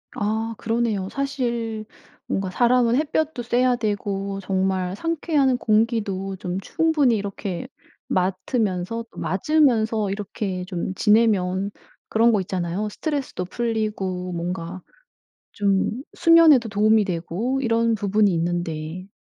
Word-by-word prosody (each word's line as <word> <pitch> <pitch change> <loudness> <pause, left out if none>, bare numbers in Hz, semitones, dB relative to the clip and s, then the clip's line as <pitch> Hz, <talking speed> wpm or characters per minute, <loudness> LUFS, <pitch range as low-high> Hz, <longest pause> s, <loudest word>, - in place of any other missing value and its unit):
아 220 +2 -1
그러네요. 225 -4 -1
사실 235 -5 -2 0.4
뭔가 195 -1 -1
사람은 240 +3 +3
햇볕도 310 -3 -1
쐬야 245 +1 +2
되고 200 -3 -2
정말 190 -1 0
상쾌한 300 -5 +1
공기도 215 -4 0
좀 180 0 -4
충분히 295 - +2
이렇게 200 -3 -4 0.4
맡으면서 190 +3 -1
또 - - -11
맞으면서 220 -3 +2
이렇게 195 -2 -4
좀 185 0 -4
지내면 200 -3 +2 0.4
그런 230 +1 +4
거 205 - +2
있잖아요. 185 +2 -2
스트레스도 275 - -3
풀리고 200 -4 -2
뭔가 175 +1 -4 0.7
좀 200 -1 +1 0.2
수면에도 325 -7 +6
도움이 215 0 +3
되고 190 +9 -2
이런 230 -2 +2
부분이 205 -1 +2
있는데 170 0 -3
210 Hz, 265 characters per minute, -23 LUFS, 185-235 Hz, 0.7 s, 수면에도